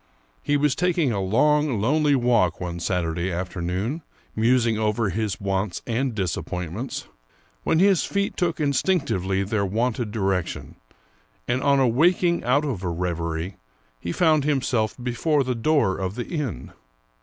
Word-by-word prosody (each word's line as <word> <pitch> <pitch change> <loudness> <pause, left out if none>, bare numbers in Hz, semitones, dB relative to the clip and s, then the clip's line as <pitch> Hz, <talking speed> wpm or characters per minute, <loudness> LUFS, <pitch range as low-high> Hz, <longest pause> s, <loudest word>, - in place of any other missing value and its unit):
He 145 - +1
was 145 -1 +2
taking 170 -4 +1
a 100 -3 -1
long, 145 +6 +2
lonely 145 +6 +3
walk 115 - +2
one 85 -1 -4
Saturday 85 0 -1
afternoon, 90 - -3 0.3
musing 115 0 +3
over 105 0 0
his 105 +1 -2
wants 95 -2 -2
and 120 +1 -1
disappointments, 90 - -4 0.5
when - - +1
his 190 0 +4
feet 200 0 -1
took 170 -3 -1
instinctively 140 - +1
their 100 +1 -1
wonted 115 +3 -1
direction, 95 -5 -2 0.7
and 130 +2 0
on 140 -1 +3
awaking 170 +8 +3
out 140 +5 +2
of 125 -11 -3
a 90 - -1
reverie, 85 0 -3 0.4
he 85 - -4
found 155 - +3
himself 130 -7 0
before 140 +4 +1
the 130 0 -1
door 115 -5 +1
of 95 +1 -3
the 120 - -4
inn. 145 - -4
115 Hz, 140 wpm, -24 LUFS, 95-145 Hz, 0.7 s, his